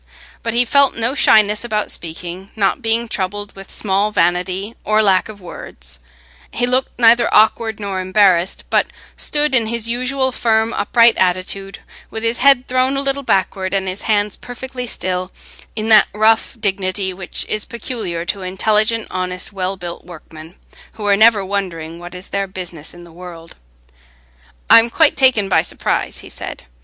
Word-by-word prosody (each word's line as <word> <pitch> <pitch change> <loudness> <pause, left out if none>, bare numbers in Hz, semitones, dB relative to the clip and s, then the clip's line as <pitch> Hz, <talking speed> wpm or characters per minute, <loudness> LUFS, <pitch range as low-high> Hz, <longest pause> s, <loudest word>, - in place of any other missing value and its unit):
But 230 0 -3
he 245 +1 +4
felt 280 +3 +3
no 230 +3 0
shyness 215 -6 +4
about 215 -3 -2
speaking, 175 +3 -7
not 205 +3 0
being 230 0 0
troubled 205 0 -4
with 195 0 -11
small 200 0 0
vanity 185 +2 -1
or 215 +1 +2
lack 195 0 +2
of 210 -2 -10
words; - - -10 0.5
he 245 - -1
looked 255 +1 -1
neither 235 0 +4
awkward 220 +1 +3
nor 200 -2 -4
embarrassed, 185 -1 +2
but - - +2 0.3
stood 295 -1 0
in 235 -4 +3
his 230 0 0
usual 260 +2 0
firm 225 -2 +1
upright 230 +2 +4
attitude, 185 +2 -1 0.3
with 220 - -6
his 230 +1 0
head 270 -1 +4
thrown 255 +2 +1
a - - +1
little 275 0 -2
backward 190 -5 -1
and 190 -1 -1
his 185 +2 -4
hands 210 -2 0
perfectly 250 0 -7
still, 185 -2 -2 0.4
in 215 0 -3
that 215 -1 +7
rough 220 +3 +2
dignity 190 -1 -2
which 180 -1 -5
is 215 0 -2
peculiar 215 -8 -5
to 195 +3 -3
intelligent, 215 +4 0
honest, 185 +2 -4
well 190 0 -3
built 175 -2 -7
workmen, 160 0 -13 0.4
who 215 - -8
are 200 -1 +4
never 215 -1 +4
wondering 170 -4 -4
what 175 +1 -10
is 180 +1 -10
their 200 0 -2
business 175 -4 -8
in 175 - -13
the 170 - -15
world. 170 -1 -11 1.1
"I'm 230 +1 +7
quite 315 +4 +3
taken 255 -7 +3
by 180 -4 +3
surprise," 170 - -2
he - - -11
said. - - -8
205 Hz, 165 wpm, -17 LUFS, 185-230 Hz, 1.1 s, that